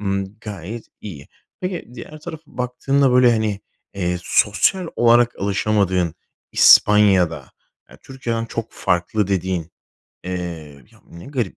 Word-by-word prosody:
ımm, 100 0 -3
gayet 105 +2 -7 0.2
iyi. 80 -9 -9 0.3
Peki, 185 -1 -4
diğer 155 +3 -10
tarafa 160 -1 -8
baktığında, 125 +2 0
böyle, 125 -1 +5
hani, 110 -3 -1 0.3
eee, 90 -2 -2
sosyal 170 - +1
olarak 120 0 +4
alışamadığın 100 -4 0 0.4
İspanya'da, 95 -8 +5 0.4
eee, - - -15
Türkiye'den 120 -4 -4
çok 115 0 -6
farklı 90 +4 0
dediğin, 95 -3 -2 0.5
eee, 85 -7 -6
"ya, - - -22
ne 85 - -12
garip 125 -8 -3
105 Hz, 120 wpm, -20 LUFS, 90-120 Hz, 0.5 s, böyle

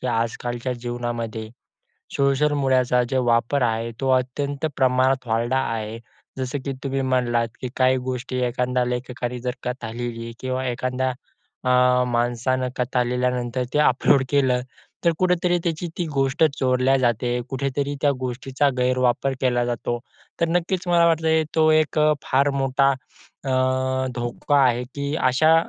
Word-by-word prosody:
की - - -4
आज 115 -1 0
कालच्या 120 +1 -3
जीवनामध्ये 120 -2 -4 0.7
सोशल 140 +2 +2
मीडियाचा 130 -3 +2
जो 130 -1 +1
वापर 120 +4 +2
आहे 115 0 0
तो 135 - 0
अत्यंत 140 +4 -3
प्रमाणात 130 -1 +2
वाढला 115 +3 +1
आहे. 115 -2 -3 0.4
जसं 130 +2 -3
की 140 - -1
तुम्ही 135 0 -1
म्हणलात 125 -3 +1
की 130 - -2
काही 130 0 +4
गोष्टी 130 0 -3
एखादा 125 +1 0
लेखकाने 125 0 -3
जर 125 +1 -2
कथा 125 -2 -4
लिहिली 115 0 -5
किंवा 130 0 -2
एखादा 130 +1 -1 0.6
अ, 125 0 +4
माणसानं 120 +2 0
कथा 125 0 +1
लिहल्यानंतर 125 0 -1
त्या 150 0 +4
अपलोड 130 +2 +3
केलं, 130 -3 +2 0.4
तर 170 - +5
कुठेतरी 180 -1 +2
त्याची 170 0 -2
ती 175 - -1
गोष्ट 135 +2 +1 0.2
चोरल्या 130 +1 +3
जाते, 120 -1 +1
कुठेतरी 140 +1 -2
त्या 145 - +4
गोष्टीचा 130 +3 -1
गैरवापर 125 +1 +1
केला 125 -2 +2
जातो. 120 0 -2 0.4
तर 170 - +3
नक्कीच 175 +2 -1
मला 170 -1 +4
वाटतं 160 -1 +2
तो 155 -1 +4
एक 155 0 +2
अ, 150 0 +5
फार 140 +2 +2
मोठा 135 +1 +3
अ, 130 0 -9 0.6
धोका 120 +4 0
आहे 125 -1 +2
की 140 +1 -2
अशा 155 +5 +4
130 Hz, 145 wpm, -23 LUFS, 120-140 Hz, 0.7 s, तर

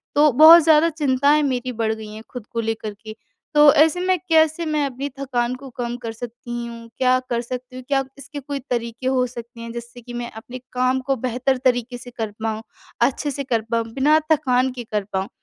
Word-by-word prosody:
तो 295 0 +5
बहुत 315 +5 +9
ज़्यादा 320 +1 +5
चिंताएँ 290 -1 +2
मेरी 255 -2 -1
बढ़ 220 -1 0
गई 220 -1 -8
हैं 220 +1 -9
खुद 245 -4 -8
को 230 - -3
लेकर 220 -1 -3
के। 215 - -7 0.4
तो 295 -1 +8
ऐसे 320 +4 +4
में 370 0 +2
कैसे 320 +1 +3
मैं 305 -2 0
अपनी 270 +1 -4
थकान 250 -3 -1
को 275 - -10
कम 240 0 -3
कर 235 -2 -6
सकती 240 +1 -6
हूँ? 230 0 -10
क्या 255 0 +3
कर 235 -1 0
सकती 250 +1 -7
हूँ? 255 - -8
क्या 275 -1 +1
इसके 285 +2 -8
कोई 280 0 -5
तरीके 235 +1 -2
हो 260 -1 +2
सकते 235 -1 -10
हैं, 230 0 -7
जिससे 240 +1 -9
कि 240 +1 -10
मैं 240 0 -4
अपने 245 +3 -9
काम 255 +1 +1
को 270 - +2
बेहतर 255 +2 -1
तरीके 245 -1 +1
से 245 +1 -11
कर 220 -2 -3
पाऊँ, 220 -1 -2 0.4
अच्छे 275 +4 +1
से 280 +1 -4
कर 235 -4 0
पाऊँ, 230 -1 +1
बिना 295 +4 +4
थकान 260 -4 +2
के 245 - -6
कर 210 -1 0
पाऊँ? 190 0 -1
250 Hz, 215 wpm, -22 LUFS, 235-280 Hz, 0.4 s, बहुत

